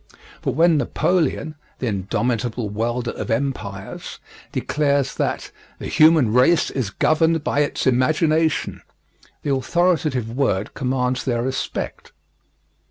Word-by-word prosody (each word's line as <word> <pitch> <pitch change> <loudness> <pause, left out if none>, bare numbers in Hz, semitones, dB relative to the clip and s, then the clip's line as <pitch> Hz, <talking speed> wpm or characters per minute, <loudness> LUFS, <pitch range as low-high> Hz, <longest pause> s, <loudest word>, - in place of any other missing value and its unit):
But - - -1
when 165 0 +4
Napoleon 155 -1 0 0.2
the - - -4
indomitable 115 +2 -1
welder 120 +3 -2
of - - -6
empires 110 -6 -4 0.3
declares 140 -2 0
that - - -2 0.3
"The - - -8
human 155 -8 +5
race 155 +7 +4
is 125 -7 -2
governed 160 +8 +2
by 145 - 0
its 145 - 0
imagination," 155 +5 +1 0.6
the 140 - 0
authoritative 135 -5 0
word 105 -8 0
commands 125 -1 -1
their 120 -3 -1
respect. 130 +1 -4
130 Hz, 110 wpm, -21 LUFS, 120-155 Hz, 0.6 s, human